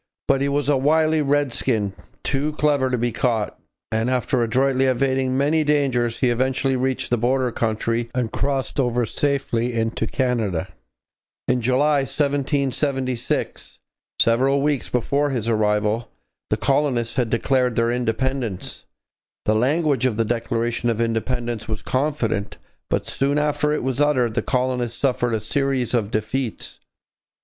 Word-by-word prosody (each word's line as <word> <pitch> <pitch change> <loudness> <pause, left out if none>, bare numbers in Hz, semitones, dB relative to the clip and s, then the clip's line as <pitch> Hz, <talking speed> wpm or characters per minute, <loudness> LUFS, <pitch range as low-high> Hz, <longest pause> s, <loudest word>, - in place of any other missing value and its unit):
But 135 -1 +3
he 140 - +1
was 145 0 0
a 145 -2 +3
wily 155 +3 +3
redskin, 130 -7 0 0.3
too 145 +3 -1
clever 145 -3 +2
to 125 - 0
be 120 +1 0
caught, 115 -5 -1 0.3
and 110 +2 0
after 130 0 +1
adroitly 130 +3 +2
evading 130 0 +1
many 150 +3 +2
dangers 130 -6 +1
he 125 -2 +3
eventually 130 +2 +1
reached 130 0 -1
the 120 - +2
border 125 +1 +1
country 115 +1 -1
and 120 -3 -1
crossed 140 0 -1
over 120 -2 +1
safely 125 -2 -1
into 115 0 -1
Canada. 115 -11 -1 0.8
In 125 0 +1
July 140 +5 +3
1776, 140 -2 -1 0.4
several 135 +4 +3
weeks 145 -3 0
before 140 +4 +1
his 120 -5 -2
arrival, 105 0 +1 0.4
the - - +1
colonists 135 -4 +1
had 125 -4 0
declared 125 +1 +1
their 115 0 +2
independence. 125 -3 -2 0.6
The 110 - +3
language 135 +2 +2
of 110 -4 -2
the 115 - +2
Declaration 115 +1 -1
of 115 -1 -1
Independence 115 0 -1
was 110 -1 -4
confident, 130 -7 -1 0.3
but - - 0
soon 140 +2 0
after 150 0 +1
it 150 - -1
was 130 +1 -1
uttered 130 -6 +2
the - - 0
colonists 125 -2 -1
suffered 120 -3 +1
a - - -1
series 130 +2 -1
of 110 -4 +1
defeats. 110 +3 -3
125 Hz, 140 wpm, -22 LUFS, 115-140 Hz, 0.8 s, But